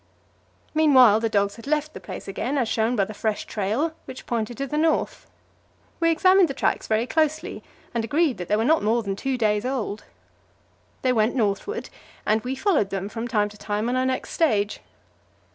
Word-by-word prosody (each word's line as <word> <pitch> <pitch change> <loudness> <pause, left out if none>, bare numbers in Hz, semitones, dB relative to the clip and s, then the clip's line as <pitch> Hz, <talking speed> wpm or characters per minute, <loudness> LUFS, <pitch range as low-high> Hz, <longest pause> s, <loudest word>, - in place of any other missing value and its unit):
Meanwhile 260 -9 +6
the 225 0 0
dogs 200 -1 0
had 230 - -11
left 305 +1 0
the - - -8
place 185 - -8
again, 245 +8 -2
as 245 -4 +1
shown 225 +2 +1
by 200 -4 +2
the 215 - -8
fresh 215 0 -2
trail, 225 +11 -1
which 255 - -9
pointed 235 0 -2
to 275 - -2
the 275 - -4
north. 315 +1 0 0.7
We 330 -1 +3
examined 370 +3 +5
the 275 - -4
tracks - - 0
very 220 +1 +1
closely, 310 +2 -1 0.3
and 230 -1 -1
agreed 285 - +1
that 180 - -5
they 210 - +2
were 220 +2 +1
not 320 +4 +4
more 225 +3 +1
than 195 -2 -3
two 265 +5 -2
days 210 -2 +1
old. 245 -5 -3 1.0
They 255 -1 +3
went 220 +1 +2
northward, 235 - -1 0.3
and 215 +1 +2
we 255 +2 -3
followed 295 - +1
them 195 0 -3
from 225 +2 -4
time 210 -4 +1
to 210 0 -15
time 210 +2 -2
on 250 - 0
our 255 0 +1
next 260 0 -2
stage. 210 -11 +1
235 Hz, 195 wpm, -24 LUFS, 210-285 Hz, 1.0 s, Meanwhile